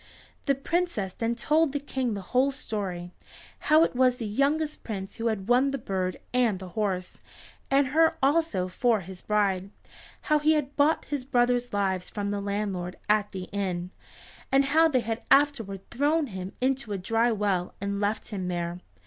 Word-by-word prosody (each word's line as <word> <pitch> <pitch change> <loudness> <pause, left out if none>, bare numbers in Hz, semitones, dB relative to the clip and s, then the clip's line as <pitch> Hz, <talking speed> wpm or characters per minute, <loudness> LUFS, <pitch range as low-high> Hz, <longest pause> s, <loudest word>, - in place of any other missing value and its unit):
The 275 - +4
Princess 275 - -1
then 230 +1 -1
told 300 +4 +2
the 285 - 0
King 260 -5 -2
the 200 - -4
whole 260 +2 +4
story, 195 -9 -4 0.5
how 310 +2 +5
it 330 - 0
was 250 0 +3
the 230 - -4
youngest 290 +8 0
Prince 195 -3 -6
who 230 - -1
had 210 -3 -2
won 250 +3 +4
the 275 - -2
bird 190 -6 -2 0.2
and 240 -6 +2
the 185 0 -8
horse, 185 -3 -2 0.5
and 275 0 +3
her 320 +3 +3
also 275 - +2
for 220 +3 +1
his 185 0 -10
bride; 200 -3 0 0.5
how 305 0 +2
he 310 +1 +4
had 290 -2 -1
bought 300 +2 +3
his 285 -3 -3
brothers' 245 -1 +1
lives 190 -3 -1
from 205 -1 -3
the 205 0 -2
landlord 200 -3 -3
at 210 -1 +2
the 190 -1 -5
inn, 185 -3 -2 0.6
and 275 +1 +4
how 320 +4 +5
they 260 -6 +2
had 225 +1 -3
afterward 260 -9 +2
thrown 295 +5 +2
him 185 0 -6
into 260 -4 0
a - - -1
dry 225 +5 +1
well 200 -4 -1
and 200 0 -2
left 210 +1 -1
him 190 -5 -4
there. 175 0 -3
225 Hz, 180 wpm, -27 LUFS, 195-275 Hz, 0.6 s, how